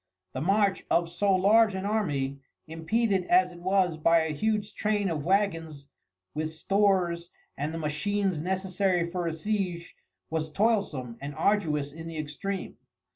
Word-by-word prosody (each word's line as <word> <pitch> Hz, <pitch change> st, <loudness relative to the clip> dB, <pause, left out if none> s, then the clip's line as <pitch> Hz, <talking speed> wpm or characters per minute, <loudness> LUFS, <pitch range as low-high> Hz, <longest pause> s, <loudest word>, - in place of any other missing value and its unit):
The 130 Hz, -, -3 dB
march 195 Hz, +3 st, +2 dB
of 170 Hz, 0 st, +2 dB
so 200 Hz, +3 st, +1 dB
large 210 Hz, +2 st, +4 dB
an 190 Hz, +1 st, -3 dB
army, 145 Hz, -11 st, -1 dB, 0.3 s
impeded 185 Hz, +5 st, 0 dB
as 180 Hz, 0 st, +4 dB
it 175 Hz, -, -12 dB
was 185 Hz, -2 st, +1 dB
by 165 Hz, +1 st, +4 dB
a 160 Hz, -1 st, -2 dB
huge 210 Hz, +5 st, -1 dB
train 210 Hz, -3 st, 0 dB
of 150 Hz, -3 st, -2 dB
wagons 165 Hz, -6 st, 0 dB, 0.4 s
with 155 Hz, +1 st, -2 dB
stores 175 Hz, 0 st, +1 dB, 0.3 s
and 145 Hz, +3 st, -3 dB
the 165 Hz, -, -5 dB
machines 175 Hz, +3 st, -1 dB
necessary 185 Hz, -1 st, 0 dB
for 175 Hz, -1 st, -2 dB
a 165 Hz, -, -1 dB
siege, 180 Hz, -1 st, -3 dB, 0.4 s
was 160 Hz, -1 st, -2 dB
toilsome 160 Hz, -, 0 dB
and 140 Hz, +1 st, -6 dB
arduous 150 Hz, -9 st, +1 dB
in 165 Hz, +2 st, -9 dB
the 165 Hz, -1 st, -6 dB
extreme. 155 Hz, +6 st, -4 dB
175 Hz, 150 wpm, -28 LUFS, 155-200 Hz, 0.4 s, large